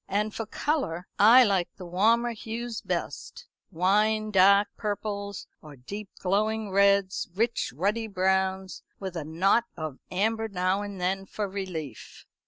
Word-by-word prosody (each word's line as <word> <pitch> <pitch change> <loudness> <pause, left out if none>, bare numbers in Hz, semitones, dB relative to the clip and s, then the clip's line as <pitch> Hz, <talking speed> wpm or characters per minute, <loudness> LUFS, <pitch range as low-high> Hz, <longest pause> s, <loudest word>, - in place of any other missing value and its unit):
And 210 +2 -1
for 225 - -5
colour 220 - -2
I 235 +5 +8
like 195 -6 +1
the 185 - -9
warmer 225 +7 +2
hues 230 +1 -5
best 485 0 -5 0.2
wine 210 +4 +1
dark 200 +1 +5
purples 205 -1 -4 0.2
or 150 -2 -12
deep 195 +11 -8
glowing 210 +2 0
reds; 200 -1 +2
rich 230 +3 0
ruddy 205 - -1
browns, 190 -1 0 0.2
with 190 -2 -6
a 165 - -3
knot 185 +9 +2
of 155 -4 -5
amber 220 +4 0
now 185 0 0
and 200 -2 -6
then 190 +2 -1
for 210 +1 -3
relief." 180 - -7
200 Hz, 140 wpm, -27 LUFS, 185-215 Hz, 0.2 s, I